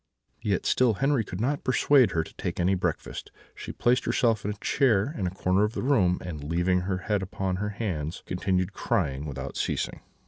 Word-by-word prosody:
"Yet 100 Hz, -4 st, 0 dB
still 125 Hz, -4 st, +3 dB
Henri 135 Hz, 0 st, +2 dB
could 90 Hz, -2 st, -7 dB
not 140 Hz, +6 st, 0 dB
persuade 130 Hz, -2 st, +4 dB
her 80 Hz, -3 st, 0 dB
to -, -, -13 dB
take -, -, -4 dB
any 90 Hz, +2 st, +3 dB
breakfast; 95 Hz, -, -3 dB, 0.2 s
she -, -, -7 dB
placed 125 Hz, +1 st, +1 dB
herself 115 Hz, -4 st, +2 dB
in 105 Hz, -, -2 dB
a 105 Hz, -, -3 dB
chair 120 Hz, +2 st, +2 dB
in 95 Hz, -, -1 dB
a -, -, 0 dB
corner 95 Hz, +2 st, +1 dB
of 105 Hz, +1 st, 0 dB
the -, -, -3 dB
room, 100 Hz, -10 st, +3 dB
and, 80 Hz, -5 st, -6 dB
leaning 85 Hz, +4 st, +1 dB
her 95 Hz, -, 0 dB
head 105 Hz, -2 st, +1 dB
upon 95 Hz, 0 st, -2 dB
her 105 Hz, +2 st, -2 dB
hands, 90 Hz, -7 st, -4 dB
continued 90 Hz, 0 st, -1 dB
crying 70 Hz, +1 st, -1 dB
without 70 Hz, -1 st, -6 dB
ceasing. -, -, -2 dB
95 Hz, 200 wpm, -27 LUFS, 90-115 Hz, 0.2 s, persuade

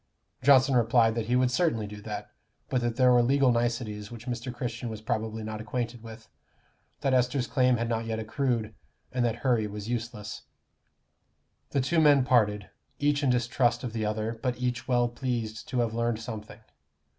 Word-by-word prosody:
Johnson 135 Hz, -1 st, +5 dB
replied 115 Hz, -1 st, +4 dB
that 115 Hz, -1 st, -3 dB
he 125 Hz, -, +2 dB
would 125 Hz, 0 st, +3 dB
certainly 125 Hz, -7 st, +1 dB
do 105 Hz, 0 st, -9 dB
that; -, -, -6 dB, 0.4 s
but 125 Hz, -, +1 dB
that 120 Hz, -1 st, -1 dB
there 125 Hz, 0 st, +5 dB
were 120 Hz, -1 st, +6 dB
legal 135 Hz, +1 st, +3 dB
niceties 115 Hz, -3 st, -1 dB
which 120 Hz, 0 st, -10 dB
Mr. 125 Hz, 0 st, -4 dB
Christian 120 Hz, -1 st, -4 dB
was 110 Hz, -1 st, -6 dB
probably 110 Hz, -1 st, -3 dB
not 110 Hz, 0 st, -5 dB
acquainted 120 Hz, +1 st, -4 dB
with; 110 Hz, -1 st, -11 dB, 0.7 s
that 135 Hz, -2 st, +1 dB
Esther's 125 Hz, +1 st, +2 dB
claim 125 Hz, -1 st, +2 dB
had 115 Hz, +1 st, -1 dB
not 115 Hz, -1 st, -2 dB
yet 110 Hz, -1 st, -2 dB
accrued, 110 Hz, -1 st, -1 dB, 0.4 s
and 125 Hz, -1 st, 0 dB
that 115 Hz, -2 st, +1 dB
hurry 120 Hz, -4 st, +2 dB
was 105 Hz, +1 st, -7 dB
useless. 115 Hz, -3 st, -4 dB, 1.3 s
The 140 Hz, -, +1 dB
two 160 Hz, +5 st, +2 dB
men 145 Hz, -4 st, +5 dB
parted, 105 Hz, -5 st, +2 dB, 0.3 s
each 145 Hz, 0 st, +1 dB
in 140 Hz, -, +2 dB
distrust 120 Hz, -1 st, +1 dB
of 120 Hz, -3 st, -4 dB
the 110 Hz, -1 st, -2 dB
other, 110 Hz, +2 st, -2 dB
but 125 Hz, -3 st, -1 dB
each 125 Hz, -2 st, -2 dB
well 120 Hz, -2 st, +3 dB
pleased 120 Hz, -3 st, -4 dB
to 125 Hz, -, 0 dB
have 115 Hz, -2 st, -1 dB
learned 115 Hz, -1 st, 0 dB
something. 110 Hz, -2 st, -8 dB
120 Hz, 180 wpm, -28 LUFS, 110-125 Hz, 1.3 s, were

